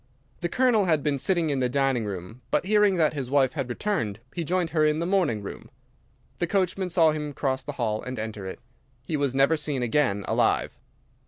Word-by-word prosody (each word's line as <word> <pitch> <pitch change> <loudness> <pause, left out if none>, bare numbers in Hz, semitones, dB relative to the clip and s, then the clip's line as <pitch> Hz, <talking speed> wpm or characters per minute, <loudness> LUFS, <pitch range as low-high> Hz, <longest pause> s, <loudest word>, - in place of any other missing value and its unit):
The 175 - -2
Colonel 240 -2 +3
had 160 -5 +2
been 145 -2 0
sitting 165 +2 +1
in 140 - 0
the 125 -1 +1
dining 135 -3 +1
room, 100 +4 -7
but - - +1
hearing 210 -1 +4
that 160 -3 +2
his 135 -4 -4
wife 135 -2 +3
had 135 -5 -3
returned 120 - -2
he 170 - -3
joined 175 0 0
her 155 -1 +2
in 150 0 +3
the 165 - -1
morning 170 - +1
room. - - -8 0.7
The 175 - 0
coachman 185 0 0
saw 165 -3 +4
him 150 -1 -4
cross 135 -1 -1
the 145 +3 -6
hall 110 -5 -1
and 125 0 -6
enter 110 -3 -5
it. 95 - -7 0.4
He 155 - -3
was 140 -3 0
never 135 +4 +4
seen 150 -4 -2
again 120 -5 +1
alive. - - +1
145 Hz, 205 wpm, -26 LUFS, 125-170 Hz, 0.7 s, hearing